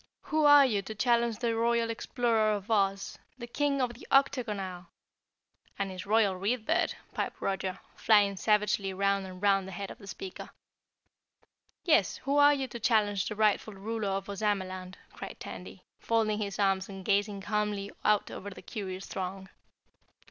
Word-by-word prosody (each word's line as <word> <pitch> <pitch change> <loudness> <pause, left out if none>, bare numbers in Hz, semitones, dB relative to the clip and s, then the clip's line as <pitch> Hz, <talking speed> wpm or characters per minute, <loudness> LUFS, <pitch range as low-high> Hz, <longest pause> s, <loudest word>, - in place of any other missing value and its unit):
"Who 310 -1 +1
are 290 -1 +8
you 210 -6 +1
to 215 +2 -8
challenge 235 0 +2
the 235 -2 -1
Royal 230 0 +1
Explorer 225 -2 +1
of 205 +1 -5
Oz, 195 -2 0 0.2
the 240 - -6
King 280 +3 0
of 250 -2 0
the 240 - -13
Octagon 250 -6 +2
Isle 180 -2 -7 0.4
" - - -38
"And 195 -1 -2
his 185 +1 -7
Royal 210 -2 +3
Read 215 +5 -1
Bird," 330 +1 +1 0.2
piped - - -3
Roger, 195 -1 -2 0.2
flying 205 -2 +4
savagely 210 -1 +1
round 200 0 +1
and 185 -1 -10
round 195 -1 +2
the - - -7
head 195 +2 -6
of - - -12
the 200 - -13
speaker. 190 -1 -7 1.4
"Yes, 305 - +3
who 280 +2 -1
are 290 0 +7
you 270 -2 -2
to 235 - -7
challenge 210 -4 +2
the 210 - -4
rightful 215 0 +1
ruler 215 +1 -3
of 195 0 -2
Ozamaland?" 190 -3 -2 0.2
cried - - -8
Tandy, - - -9 0.2
folding 220 -2 +1
his 200 -2 -3
arms 195 -1 +1
and 195 -1 -8
gazing 200 0 +1
calmly 205 0 -2
out 210 -1 +2
over 205 - -6
the 195 - -12
curious 190 -4 -6
throng. 190 0 -5
205 Hz, 170 wpm, -30 LUFS, 195-230 Hz, 1.4 s, are